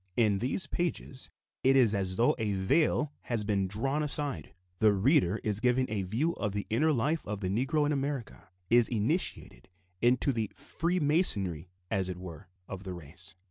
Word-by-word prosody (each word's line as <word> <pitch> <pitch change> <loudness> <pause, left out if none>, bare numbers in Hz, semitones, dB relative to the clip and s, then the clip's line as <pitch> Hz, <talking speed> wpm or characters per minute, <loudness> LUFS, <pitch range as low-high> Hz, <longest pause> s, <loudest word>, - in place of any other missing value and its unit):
In 105 -4 +3
these 135 - 0
pages 155 -4 -4 0.3
it 135 +1 +4
is 120 -5 +5
as 95 -2 0
though 115 +5 +3
a 105 -2 0
veil 145 - +1
had 115 -4 -2
been 100 -2 0
drawn 135 +10 -1
aside: 145 - -1 0.3
the 110 -1 +5
reader 110 - +3
is 105 -2 +1
given 125 +2 +2
a 105 -2 -1
view 115 - -1
of 105 -3 -2
the 100 -1 -3
inner 150 +8 +3
life 150 +4 0
of 105 0 -4
the 95 - -2
Negro 135 +9 +1
in 145 - 0
America, 135 -8 -4 0.2
is 120 -1 +6
initiated 115 - -2 0.3
into 125 +3 +3
the 110 -3 -2
"freemasonry," 145 - 0 0.2
as 95 -1 0
it 90 - -5
were, 90 0 -9 0.2
of 95 0 -7
the 95 -2 -5
race. 90 +4 -9
115 Hz, 175 wpm, -30 LUFS, 95-140 Hz, 0.3 s, is